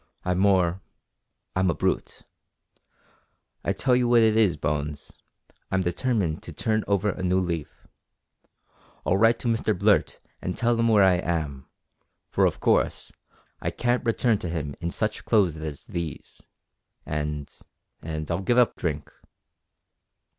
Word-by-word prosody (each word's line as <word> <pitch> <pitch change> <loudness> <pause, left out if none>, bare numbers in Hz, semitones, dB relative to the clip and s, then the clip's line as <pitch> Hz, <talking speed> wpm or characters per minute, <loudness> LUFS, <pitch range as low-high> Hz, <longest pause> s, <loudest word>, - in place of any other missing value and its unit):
I'm 90 0 +1
more 95 -2 +3 0.7
I'm 95 0 +2
a 85 - 0
brute. - - -2 1.4
I - - 0
tell 125 -2 +2
you 125 -1 +2
what 120 -1 +5
it 110 -1 +4
is, 110 -5 +3
Bones, 75 0 -3 0.6
I'm 95 0 +1
determined 90 -3 -1
to - - -9
turn 110 +7 0
over 100 0 +1
a 95 - -7
new 90 0 +2
leaf. 85 -4 -4 1.2
I'll 95 - +2
write 115 +3 +4
to - - -3
Mr 115 -3 +1
Blurt 100 +2 +2 0.2
and 90 - -3
tell 120 0 +2
him 115 - +3
where 105 -3 +5
I 95 -2 +5
am, 75 -7 -3 0.6
for, - - +4
of - - -3
course, - - +1 0.5
I - - -1
can't 120 +1 0
return 115 -2 +2
to 90 - -4
him 75 -4 -4
in 85 - -1
such 110 +4 -2
clothes 100 -8 +3
as 75 -2 -6
these, 85 -4 -6 0.6
and 75 -1 -3 0.5
and 80 0 -4
I'll 85 +3 -1
give 120 +6 +1
up 125 -2 +4
drink." 75 -4 -3
95 Hz, 145 wpm, -25 LUFS, 80-110 Hz, 1.4 s, what